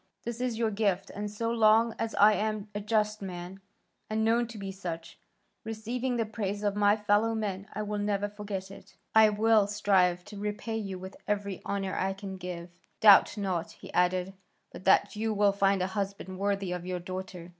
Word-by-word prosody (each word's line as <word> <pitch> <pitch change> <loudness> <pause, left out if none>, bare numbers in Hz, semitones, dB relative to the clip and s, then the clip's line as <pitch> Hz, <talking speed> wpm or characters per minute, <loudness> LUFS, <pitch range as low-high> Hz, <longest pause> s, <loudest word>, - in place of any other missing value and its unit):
This 235 0 -5
is 250 -3 -1
your 225 -1 +1
gift, 200 -3 0
and, 205 +1 -4
so 230 +2 -2
long 225 0 +4
as 225 0 -2
I 210 +1 +7
am 215 -1 -2
a 205 - -2
just 215 0 0
man 180 0 -7 0.5
and 220 0 0
known 235 +1 +2
to 230 -1 -9
be 195 -1 -5
such, 175 -4 -7 0.4
receiving 235 +3 -3
the 230 - +1
praise 205 -2 -4
of 205 -1 0
my 205 0 +4
fellow 210 +2 +2
men, 200 -2 -3
I 215 - -3
will 210 0 -3
never 205 0 0
forget 205 -2 -6
it; 195 - -14 0.2
I 220 -1 +7
will 215 0 +3
strive 190 -4 +2
to 205 -1 -9
repay 210 +2 -3
you 195 -4 -4
with 190 +1 -9
every 200 -2 -2
honour 195 -1 -2
I 190 +1 0
can 195 -1 -7
give. 175 -1 -7 0.3
Doubt 205 0 +7
not," 180 -5 -2
he - - -12
added, 180 +1 +1 0.4
"but - - -11
that 195 - +4
you 220 0 -1
will 205 0 +4
find 195 -1 +2
a 190 +1 -3
husband 195 -2 -4
worthy 200 -2 -1
of 180 -1 -3
your 180 0 -3
daughter. 180 -1 -7
205 Hz, 195 wpm, -29 LUFS, 190-215 Hz, 0.5 s, I